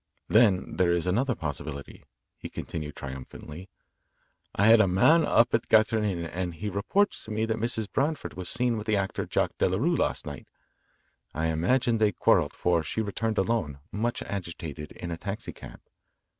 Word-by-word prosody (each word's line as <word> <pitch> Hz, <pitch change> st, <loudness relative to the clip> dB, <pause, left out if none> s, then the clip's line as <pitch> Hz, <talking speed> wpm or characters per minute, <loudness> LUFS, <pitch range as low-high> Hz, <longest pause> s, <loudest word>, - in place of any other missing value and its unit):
Then 105 Hz, -5 st, +3 dB
there 90 Hz, -2 st, +3 dB
is 85 Hz, -1 st, +1 dB
another 120 Hz, +7 st, +1 dB
possibility," 75 Hz, -2 st, -6 dB, 0.3 s
he -, -, -8 dB
continued 75 Hz, -2 st, -6 dB
triumphantly. 70 Hz, +6 st, -8 dB, 0.9 s
"I 100 Hz, -, +3 dB
had 110 Hz, 0 st, +8 dB
a 100 Hz, -, +3 dB
man 150 Hz, -, +5 dB
up 120 Hz, -4 st, +3 dB
at 115 Hz, -, +3 dB
the -, -, -28 dB
Grattan 110 Hz, 0 st, +4 dB
Inn, 90 Hz, -5 st, -1 dB
and 90 Hz, 0 st, -4 dB
he 105 Hz, +6 st, -4 dB
reports 195 Hz, -, +1 dB
to 110 Hz, -, -8 dB
me 110 Hz, +1 st, 0 dB
that 110 Hz, 0 st, -1 dB
Mrs. 115 Hz, -1 st, 0 dB
Branford 150 Hz, +2 st, -1 dB
was 90 Hz, -1 st, -4 dB
seen 120 Hz, -1 st, +1 dB
with 105 Hz, -, -6 dB
the 105 Hz, -2 st, +2 dB
actor 95 Hz, -1 st, -2 dB
Jack -, -, +1 dB
Delarue 120 Hz, -, +2 dB
last -, -, 0 dB
night. -, -, -8 dB, 0.9 s
I 80 Hz, +1 st, 0 dB
imagine 115 Hz, +9 st, +1 dB
they 105 Hz, -2 st, +3 dB
quarrelled, -, -, +3 dB
for 85 Hz, -2 st, +1 dB
she 80 Hz, +8 st, -4 dB
returned 110 Hz, +1 st, -2 dB
alone, 95 Hz, -9 st, 0 dB
much 115 Hz, +3 st, -2 dB
agitated, 85 Hz, -6 st, -6 dB
in 85 Hz, -, -7 dB
a 85 Hz, -, -3 dB
taxi 100 Hz, +4 st, -5 dB
cab. -, -, -11 dB
100 Hz, 175 wpm, -27 LUFS, 85-115 Hz, 0.9 s, had